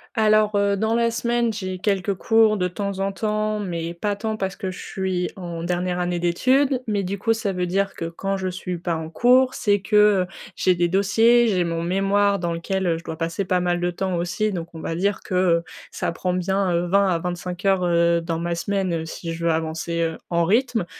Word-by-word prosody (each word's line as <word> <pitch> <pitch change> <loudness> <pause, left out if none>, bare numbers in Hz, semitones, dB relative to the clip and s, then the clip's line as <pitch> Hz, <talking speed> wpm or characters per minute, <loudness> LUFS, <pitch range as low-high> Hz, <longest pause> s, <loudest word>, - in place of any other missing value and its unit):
Alors, 215 -1 +3
heu, 200 0 +2
dans 220 +3 0
la 235 0 +2
semaine, 235 0 0
j'ai 185 -3 -4
quelques 195 0 0
cours 220 +2 +3
de 180 -2 0
temps 200 +1 -4
en 195 0 0
temps 215 0 -1
mais 170 -3 -3
pas 205 +3 -2
tant 220 +1 -3
parce 190 -2 -3
que 190 - -4
je 185 - -9
suis 185 -2 -2
en 170 -3 -6
dernière 180 +1 -1
année 175 0 -1
d'études. 255 +10 +2
Mais 205 -2 0
du 195 +2 -3
coup, 225 +3 +1
ça 210 -3 -2
veut 180 -1 -1
dire 195 +2 0
que 165 - -4
quand 195 +4 -3
je 185 0 -2
suis 180 -1 -5
pas 170 -1 -2
en 160 0 -6
cours, 255 +6 +4
c'est 205 -1 +1
que, 210 +2 0 0.3
heu, - - -9 0.3
j'ai 185 - +3
des 175 0 +1
dossiers, 225 +6 +4
j'ai 185 -4 +2
mon 165 0 -2
mémoire 195 +3 +2
dans 170 -1 -2
lequel, 190 +3 -2
heu, 165 -1 +2
je 170 - -13
dois 160 -1 -5
passer 165 +4 -2
pas 180 0 +1
mal 175 0 0
de 175 0 0
temps 185 0 -2
aussi 185 +5 -1
donc 170 -2 -6
on 160 - -8
va 165 - -3
dire 200 +3 0
que, 185 - -6
heu, 175 -2 +3 0.3
ça - - -2
prend 180 +1 -2
bien, 190 +1 0
heu, 175 +1 0
20 200 +2 +3
à 170 -2 +1
25 180 +1 -5
heures, 190 -2 +3
heu, 170 -1 +3
dans 165 -1 -2
ma 170 0 -2
semaine, 190 0 -1
heu, - - -6
si 165 +1 -6
je 170 0 -6
veux 165 - +3
avancer, 160 +1 -2
heu, 165 -1 -2
en 170 0 +2
rythme. 225 0 +1
185 Hz, 235 wpm, -23 LUFS, 170-205 Hz, 0.3 s, cours